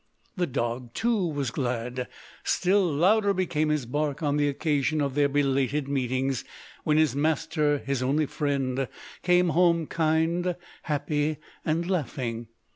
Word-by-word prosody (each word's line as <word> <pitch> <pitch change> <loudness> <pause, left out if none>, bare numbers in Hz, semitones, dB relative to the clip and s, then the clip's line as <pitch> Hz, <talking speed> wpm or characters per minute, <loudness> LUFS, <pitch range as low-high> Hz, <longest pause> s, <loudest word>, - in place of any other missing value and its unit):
The 180 -3 0
dog 120 -2 -3
too 225 -6 +1
was 145 -6 -2
glad. 125 -1 -2 0.4
Still 190 +2 +2
louder 200 +7 +3
became 170 -4 0
his 150 -4 0
bark 145 +4 -2
on 145 -1 +1
the 145 0 +2
occasion 150 +1 0
of 140 -2 0
their 145 0 +3
belated 140 0 +1
meetings, 130 -1 -1 0.4
when 150 0 +2
his 155 -5 +3
master, 150 0 +1
his 135 -2 -2
only 145 +4 +2
friend, 135 -3 -1 0.3
came 180 0 +3
home 170 -1 +3
kind, 165 +3 +1 0.3
happy, 150 0 0 0.3
and 165 +2 0
laughing. 125 -9 -2
145 Hz, 135 wpm, -27 LUFS, 135-165 Hz, 0.4 s, louder